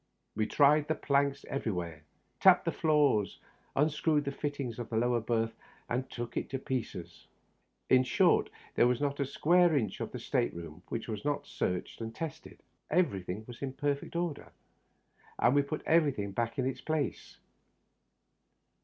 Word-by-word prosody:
We 110 0 0
tried 150 +1 +4
the 155 - +1
planks 140 -1 +1
everywhere, 90 - -3 0.4
tapped - - +6
the - - +1
floor 150 -9 +3
ing, - - -7 0.5
unscrewed 150 0 +2
the 140 - -1
fittings 140 -5 -4
of 115 -2 -5
the 110 - -1
lower 120 +1 +2
berth 115 0 0 0.3
and 125 +2 -2
took 120 -1 -6
it - - -2
to 135 - -2
pieces 130 -2 -5 0.3
— - - -44 0.3
in 130 - +7
short, - - +3 0.2
there 120 - +4
was 125 -1 +1
not 140 0 -1
a 140 - +1
square 170 +3 +4
inch 105 -7 -1
of - - -4
the - - -5
state - - -1
room 85 0 -8
which 115 - -4
was 105 -3 -4
not 145 -1 -1
searched 90 +5 -3
and 115 0 -5
tested. 160 0 -7 0.3
Every 155 - +2
thing 90 +4 -5
was 120 -1 -10
in 135 -2 -3
perfect 145 +2 -2
order, 170 -3 -3 0.9
and 120 - +4
we 145 - +5
put 140 +2 -4
everything 145 -11 +2
back 115 +3 -2
in 130 - +1
its 130 - -2
place. 155 -5 -2
135 Hz, 170 wpm, -31 LUFS, 115-145 Hz, 0.9 s, in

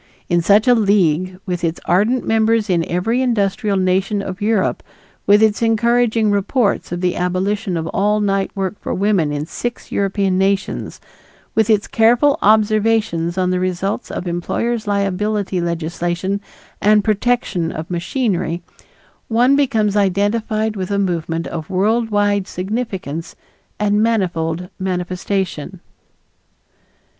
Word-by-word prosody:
In 175 0 +3
such 205 +7 +4
a 250 - +7
league, 185 -5 +2
with 180 -2 -3
its 165 0 -1
ardent 215 +8 +2
members 220 -1 +2
in 170 -2 +2
every 225 +8 0
industrial 205 -4 0
nation 190 +2 +1
of 185 0 -6
Europe, 210 -2 +1 0.5
with 205 +2 +6
its 215 0 +2
encouraging 230 -1 +2
reports 205 +1 0
of 175 0 -3
the 180 -1 0
abolition 185 +2 -1
of 160 - -3
all 210 +2 +1
night 195 -1 0
work 195 -1 -2
for - - -3
women 195 -6 +1
in 145 0 -3
six 240 +8 -5
European 195 -1 0
nations, 195 +1 -1 0.5
with 220 -1 +2
its 210 -2 +3
careful 245 +7 +3
observations 215 -5 +2
on 185 -1 +1
the 180 - 0
results 185 +2 -2
of 180 - -5
employer's 215 +6 -2
liability 200 -1 -1
legislation 175 +3 -2 0.4
and 210 0 +4
protection 215 -6 0
of 155 +1 -6
machinery, 175 -2 -1 0.6
one 245 +4 +3
becomes 225 -8 +1
identified 215 +2 0
with 185 -2 -4
a 200 - 0
movement 170 -3 -1
of 160 -2 -6
world 220 +5 +1
wide 205 -2 +1
significance 185 - -4 0.4
and 210 0 +2
manifold 180 -6 0
manifestation. 185 -1 -3
200 Hz, 130 wpm, -18 LUFS, 180-220 Hz, 0.6 s, a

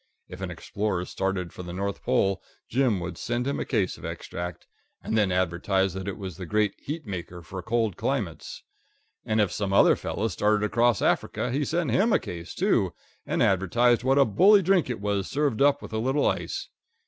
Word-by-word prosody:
If 90 +1 -10
an 95 - -3
explorer 90 +1 -3
started 95 -2 -2
for - - -8
the 90 -1 -7
North 100 +2 -3
Pole, 95 0 +1 0.3
Jim 120 -5 +1
would 85 -1 -6
send 120 +1 -2
him 140 - -1
a - - -2
case 105 -8 -1
of - - -15
Extract, 90 -1 -6 0.4
and - - -2
then 105 -4 +3
advertise 95 +1 +1
that 95 +1 -5
it 100 - -4
was 95 -5 -7
the 90 - -7
great 105 +1 +1
heat 155 +1 -6
maker 90 -3 -6
for 95 +2 -7
cold 110 -1 0
climates; 100 - -3 0.6
and 110 0 +1
if 105 -4 +2
some 100 -2 -2
other - - +6
fellow 110 - -2
started 105 +2 +1
across 120 0 +2
Africa 125 - 0
he 140 +4 0
sent 170 +3 -1
him 220 +4 +3
a - - +5
case, 85 -1 -7
too, - - +1 0.3
and - - +1
advertised 115 +6 +3
what 135 +2 +3
a 140 - +6
bully 195 - +5
drink 180 -5 +3
it 120 - -3
was 100 -1 -1
served 140 -5 0
up 145 0 +4
with - - -9
a 110 - 0
little 135 +5 +1
ice. - - -1
105 Hz, 200 wpm, -26 LUFS, 95-125 Hz, 0.6 s, other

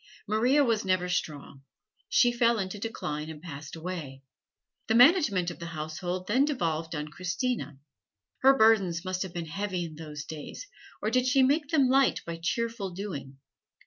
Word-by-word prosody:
Maria 245 +7 +3
was 230 -5 +1
never 185 -1 +1
strong; 150 -6 -3 0.5
she 245 - +4
fell 235 -1 +3
into 195 0 -3
a - - -12
decline 155 -9 -4
and 155 -1 -8
passed 150 -2 -8
away. 160 -6 -6 0.6
The 220 - +2
management 245 - +5
of - - -11
the 170 - -6
household 175 +4 -4
then 245 +8 +3
devolved 165 - -1
on 150 0 -4
Christina. 180 - -3 0.6
Her 270 +1 +5
burdens 195 -6 +3
must 185 0 -2
have 190 - -3
been 170 -1 -4
heavy 180 +2 -3
in 160 - -8
those 150 -2 -7
days, 155 - -8 0.4
or 215 - 0
did 255 +1 +2
she 270 0 +4
make 290 +3 +2
them 285 -5 +4
light 270 +1 +3
by 170 -1 -5
cheerful 230 +2 -2
doing? 175 -8 -7
185 Hz, 170 wpm, -28 LUFS, 160-235 Hz, 0.6 s, management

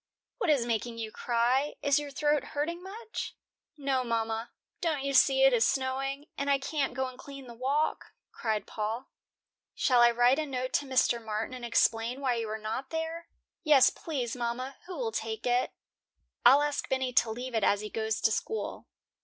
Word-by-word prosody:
"What 365 - 0
is 275 -6 +3
making 230 0 -2
you 220 -1 -4
cry? 245 +6 +1
Is 285 0 +4
your 295 -1 -6
throat 295 0 +1
hurting 335 +4 -2
much?" 430 +4 -6 0.4
"No, 270 -3 0
mama. 225 -1 -2 0.3
Don't 310 -5 0
you 275 0 -1
see 270 0 +5
it 270 -1 +6
is 230 -2 +4
snowing, 270 +2 -1
and 280 0 -1
I 280 - +4
can't 275 -1 -2
go 265 0 0
and 255 -1 -11
clean 275 -1 -10
the 240 - -10
walk?" 275 +6 0 0.3
cried 215 -3 -2
Paul. 220 +4 -4 0.7
"Shall 250 -2 +4
I 240 - +8
write 245 +4 +4
a 310 - -2
note 255 -1 -3
to 285 - +1
Mr. 250 -3 +2
Martin 220 +2 -3
and 250 -1 -8
explain 235 +1 +2
why 265 -3 +1
you 230 -2 -2
are 215 - -3
not 220 +5 -4
there?" 325 +1 -4 0.4
"Yes, 295 -5 +6
please, 260 -8 -4
mama. 250 +2 -3
Who 365 - -6
will 465 -2 -2
take 220 - -4
it?" 245 0 +2 0.7
"I'll 285 +2 +7
ask 295 -1 -2
Bennie 260 -1 0
to 235 - +4
leave 245 +3 -5
it 220 -2 +1
as 200 +1 +3
he 210 - -5
goes 220 -1 -1
to 220 - +3
school." 440 - -3
255 Hz, 190 wpm, -29 LUFS, 235-285 Hz, 0.7 s, I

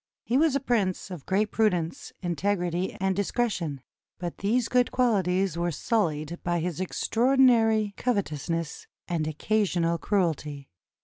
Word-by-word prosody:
He 240 - -1
was 300 0 +4
a - - +3
prince 205 -8 -1
of 170 -6 -8
great 205 +2 +1
prudence, 180 -7 0
integrity, 175 +1 -1
and 190 0 +1
discretion; 190 - -1 0.4
but 175 -1 -5
these 230 +4 +1
good 250 -1 +2
quahties 195 -7 +1
were 175 0 0
sullied 165 -3 -1
by 175 0 0
his 175 +1 -3
extraordinary 225 0 +3
covetousness 165 - -2 0.2
and 165 -3 -1
occasional 170 0 0
cruelty. 155 -8 -1
185 Hz, 125 wpm, -27 LUFS, 170-220 Hz, 0.4 s, was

